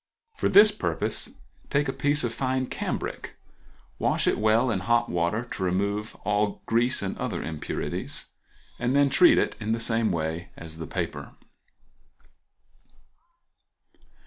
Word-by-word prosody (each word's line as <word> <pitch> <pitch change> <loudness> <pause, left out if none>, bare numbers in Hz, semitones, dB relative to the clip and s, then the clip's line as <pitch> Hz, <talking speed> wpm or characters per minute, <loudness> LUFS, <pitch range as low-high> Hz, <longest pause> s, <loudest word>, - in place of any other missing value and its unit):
For - - 0
this 210 +2 +8
purpose 210 - -3 0.3
take 145 0 +1
a 135 - -1
piece 145 +2 +1
of 120 -1 -1
fine 130 +1 -1
cambric, - - -4 0.6
wash - - +1
it - - +2
well 110 +3 +3
in 100 - 0
hot 120 +4 +1
water 85 +7 0
to 95 - -3
remove 100 +4 -1
all 105 0 0
grease 120 +3 +2
and - - -3
other - - -3
impurities, 80 -2 -4 0.5
and 125 +2 0
then 140 -1 +4
treat 180 - +6
it - - +1
in 110 0 -1
the 115 - -1
same 115 -2 +1
way 80 0 -3
as 80 -1 -9
the 80 - -5
paper. - - -4
115 Hz, 140 wpm, -26 LUFS, 95-130 Hz, 0.6 s, this